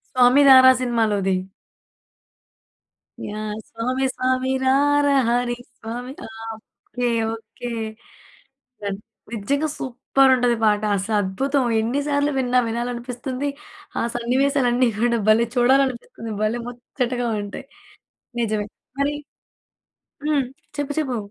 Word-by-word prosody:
'స్వామి 255 +3 +6
రారా' 260 -1 +9
సినిమాలోది. 215 -6 +1 1.9
యాహ్! 210 0 -4
స్వామి 255 +4 -2
స్వామి 255 0 0 0.2
రారా 285 +2 +3 0.2
హరి, 240 0 +1 0.2
స్వామి 240 +3 -6 0.2
ఆ! - - -10 0.3
ఓకే. 245 +2 -8 0.3
ఓకే. 225 +2 -9 1.1
దన్ 200 -1 -3 0.3
నిజ్జంగ 280 +8 0
సూప్పరుంటది 255 -1 +2
పాట. 210 -1 +3
అసద్భుతం. 210 +7 0 0.2
ఎన్ని 240 +6 0
సార్లు 285 0 +1
విన్నా 250 -1 +3
వినాలనిపిస్తుంది, 245 +3 -3 0.5
ఆ - - +1
సన్నివేశాలన్నీ 250 0 +2
కూడా 235 0 +2
భలే 230 +2 +4
చూడాలనిపిస్తుంది. 245 -3 +1
భలే 230 +3 0
ముచ్చటగా 245 0 -3
ఉంటాయి. 205 - -8 0.8
నిజమే. 215 -2 -1 0.3
మరి 290 +1 +1 1.1
హ్మ్. 285 -4 +2 0.3
చెప్పు, 290 0 -1
చెప్పు. 260 -5 -2
245 Hz, 95 wpm, -22 LUFS, 230-265 Hz, 1.9 s, రారా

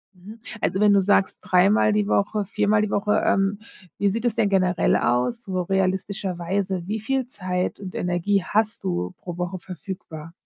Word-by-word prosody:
Mhm, 205 +5 -12 0.2
also, 190 - 0
wenn 210 0 +5
du 200 - +5
sagst: 195 0 +2
„Dreimal 200 +4 +4
die 210 -1 +1
Woche, 205 0 +1
viermal 210 +1 +1
die 210 - -1
Woche“, 210 +1 +1
ähm, 195 +1 +1 0.4
wie 205 - +1
sieht 230 +4 -3
es 240 -2 +1
denn 220 -3 +2
generell 185 -2 +2
aus, 125 - 0
so 185 -4 -2
realistischerweise, 190 -1 -1
wie 215 +1 -3
viel 265 +3 -1
Zeit 185 -6 -3
und 185 -2 -7
Energie 180 +3 0
hast 215 +2 0
du 90 0 -2
pro 175 -1 -8
Woche 180 +1 -3
verfügbar? 165 -2 -8
195 Hz, 170 wpm, -23 LUFS, 180-210 Hz, 0.4 s, wenn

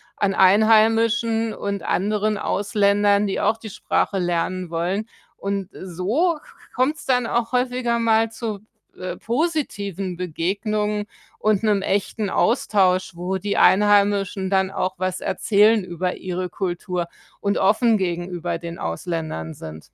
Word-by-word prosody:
an 195 -1 0
Einheimischen 225 +3 +4
und 200 -1 -4
anderen 210 +2 0
Ausländern, 205 0 +2
die 195 - -2
auch 225 - +2
die 225 -1 -9
Sprache 200 -1 -1
lernen 175 +1 -1
wollen 180 +6 -2 0.3
und 195 -1 -3
so 210 - -1
k - - -20 0.3
kommt's 285 +4 0
dann 250 -3 +2
auch 235 0 -1
häufiger 250 -1 0
mal 225 0 +2
zu, 220 -3 -4 0.4
äh, 185 - -5
positiven 220 - -2
Begegnungen 205 +5 -2 0.3
und 215 0 +1
'nem 205 -2 +2
echten 200 +1 -1
Austausch, 190 -6 +2
wo 180 +2 -2
die 200 +2 -2
Einheimischen 200 -1 +3
dann 190 -1 +1
auch 185 -1 -1
was 185 0 -2
erzählen 210 +2 +3
über 180 0 -3
ihre 180 0 -4
Kultur 175 -1 -3 0.3
und 200 0 0
offen 220 +3 +3
gegenüber 175 -2 -2
den 170 0 -7
Ausländern 85 - -4
sind. 80 0 -9
200 Hz, 130 wpm, -22 LUFS, 185-220 Hz, 0.4 s, Einheimischen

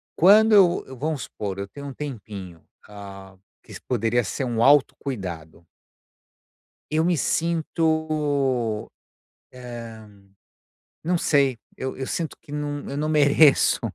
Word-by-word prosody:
quando 215 +5 +6
eu 180 -4 +5
eu 130 -1 -10
vamos 150 0 -2
supor, 100 -2 -6
eu 100 - -4
tenho 140 +8 -9
um 135 - -7
tempinho, 100 - -8 0.2
ah, 100 -2 -11 0.3
que - - -14
poderia 120 0 +1
ser 135 - -4
um 115 -1 0
auto 145 0 +5
cuidado. 85 - -6 1.3
Eu 160 +1 +1
me 175 -1 +2
sinto, 155 -8 0 0.6
eh, 115 -3 -9 1.0
não 175 +1 0
sei, 140 -6 +2 0.2
eu 130 0 -5
eu 135 0 -5
sinto 165 -2 -3
que 145 - -14
não 145 -1 -4
eu 140 - -4
não 155 +1 -1
mereço 145 -1 +4
135 Hz, 130 wpm, -24 LUFS, 110-155 Hz, 1.3 s, quando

